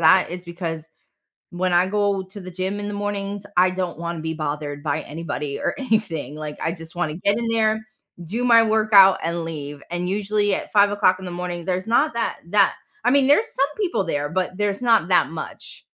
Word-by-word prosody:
that 170 +2 +5
is 180 0 -6
because, 165 -2 -5 0.6
when 180 +1 -1
I 175 +1 +4
go 200 -1 0
to 195 +2 -11
the 185 - -8
gym 190 +3 -3
in 205 - -4
the 205 - -4
mornings, 205 0 -3
I 180 +1 +5
don't 185 -3 -3
wanna 170 0 -4
be 160 0 -3
bothered 145 -1 -4
by 155 0 -1
anybody 150 -2 -5
or - - -1
anything, 210 - -1
like, 150 -1 -6
I 165 - -1
just 165 -2 -10
wanna 155 -3 -1
get 200 +5 +1
in 235 -1 -2
there, 220 -1 +1 0.4
do 225 +9 -3
my 230 -2 +7
workout, 215 -3 +6
and 170 0 -2
leave, 145 -3 -6
and 175 +1 -2
usually 205 0 +1
at - - -5
5:00 200 -2 +4
in 190 - -9
the 180 - -5
morning, 175 -1 -5
there's 185 +2 -2
not 240 +4 +2
that 230 - -2
that 200 0 +4 0.3
I 245 - +4
mean, 275 0 +4
there's 430 +12 +4
some 275 - +2
people 350 - 0
there, 145 -3 -2
but 185 +1 -2
there's 205 0 -1
not 225 -7 +3
that 180 - +3
much. 160 -1 -8
185 Hz, 205 wpm, -22 LUFS, 165-205 Hz, 0.6 s, my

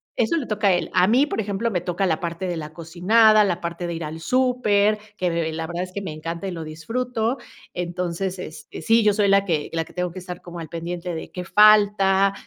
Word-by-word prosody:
eso 240 +9 +1
le 285 - -3
toca 210 -1 0
a 190 - +5
él. 175 -2 -1
A 180 -1 +5
mí, 255 +7 +4
por - - -3
ejemplo, 205 +3 -2
me 180 -4 -1
toca 180 +2 -1
la 160 -3 0
parte 170 +1 -4
de 175 -1 -2
la 155 -1 -7
cocinada, 210 +7 +4
la 180 -3 -1
parte 170 +1 -4
de 170 - -3
ir 165 0 -5
al 155 +1 -6
súper, 215 -2 +2 0.2
que, 180 - 0
de 165 -1 -1
eh, - - -5
la 160 0 -4
verdad 175 +1 -3
es 185 - -8
que 200 - -4
me 190 -5 -5
encanta 165 +4 -5
y - - -3
lo 165 -2 -5
disfruto. 230 - -2 0.4
Entonces, 180 +1 -3
este, 160 -3 -9
sí, 225 +7 +4
yo 210 -1 +4
soy 205 0 +2
la 200 0 +4
que 160 -6 -1
la 165 0 0
que - - -17
tengo 180 -1 -2
que 185 - -8
estar 180 -1 -8
como 175 -1 -9
al 165 - -7
pendiente 170 +1 -5
de 160 - -7
qué 180 - -5
falta, 200 -1 +5
180 Hz, 250 wpm, -23 LUFS, 170-210 Hz, 0.4 s, a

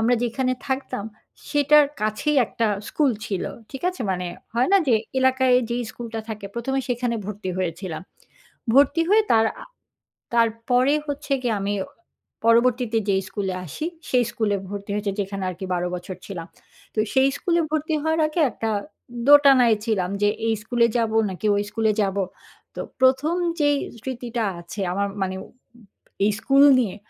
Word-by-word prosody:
আমরা 235 +2 +3
যেখানে 255 +2 0
থাকতাম 265 -6 -3 0.5
সেটার 295 0 +5
কাছেই 215 +8 0
একটা 230 - -1 0.2
স্কুল 295 -3 +2 0.2
ছিল। 195 -3 -2 0.3
ঠিক 270 - -8
আছে? 365 -7 -4
মানে 180 -1 -2 0.3
হয় 245 +2 +2
না - - +8
যে, 235 - +5 0.2
এলাকায় 260 -1 +3 0.2
যেই 240 +1 -1
স্কুলটা 225 -2 -6
থাকে 210 -2 -5
১ম 235 +3 -3
এ - - +2
সেখানে 245 -1 -1
ভর্তি 205 -2 -5
হয়েছিলাম। 180 -1 -3 0.7
ভর্তি 285 +4 +5
হয়ে 435 +2 +6
তার 225 0 +5 0.2
আ - - -9 0.7
তারপরে 235 +4 +2
হচ্ছে 285 0 -3
গিয়ে 235 -3 +1
আমি 200 +1 -1 0.7
পরবর্তীতে 235 0 +3
যেই 195 -1 +2
স্কুলে 195 -3 -2
আসি 305 - -5 0.2
সেই 250 -1 +3
স্কুলে 215 -4 0
ভর্তি 200 0 -6
হয়েছি, 205 -1 -1
যেখানে 195 0 -4
আর - - -7
কি 190 - -4
১২ 175 0 -1
বছর 180 +1 -7
ছিলাম। 175 -5 -6 0.5
তো - - -7 0.2
সেই 265 0 +5
স্কুলে 340 -1 +1
ভর্তি 310 +1 -1
হওয়ার 320 0 +1
আগে 310 +3 -2
একটা 225 -1 -3 0.6
দোটানায় 270 -6 +7
ছিলাম 190 -5 0
যে, 205 - +5 0.2
এই 225 - +3
স্কুলে 235 +1 +2
যাবো, 225 -1 0
নাকি 190 +3 -4
ওই 205 - +1
স্কুলে 220 0 +1
যাবো? 195 0 0 0.5
তো - - -4 0.2
১ম 265 +5 +3 0.3
যেই 290 -1 +4 0.2
স্মৃতিটা 240 -1 -4 0.2
আছে 175 +4 -8
আমার 200 +2 0
মানে 190 0 -1
উম - - -20 0.8
এই 210 - +3
স্কুল 275 +2 +4 0.2
নিয়ে। 205 -6 -2
230 Hz, 160 wpm, -23 LUFS, 205-265 Hz, 0.8 s, না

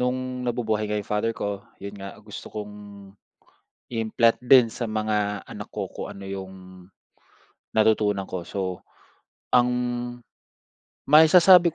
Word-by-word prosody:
no'ng 130 0 -2
nabubuhay 115 -4 -1
nga 105 - -1
yung 105 - -3
father 105 +2 -1
ko, 100 -1 -3 0.2
yun 100 +1 -8
nga, 95 0 -8
gusto 105 -1 -9
kong 105 -1 -7 1.2
i-implant 115 0 +2
din 125 -2 +7
sa 120 - -5
mga 105 -2 -1
anak - - -9
ko - - -4
kung - - -7
ano 100 0 -9
yung 95 -1 -6 1.2
natutunan 105 -2 +3
ko. 95 - -5
So, 95 +1 -4 0.7
ang 125 0 +5 1.4
maisasabi 170 +2 +7
110 Hz, 125 wpm, -25 LUFS, 100-125 Hz, 1.4 s, din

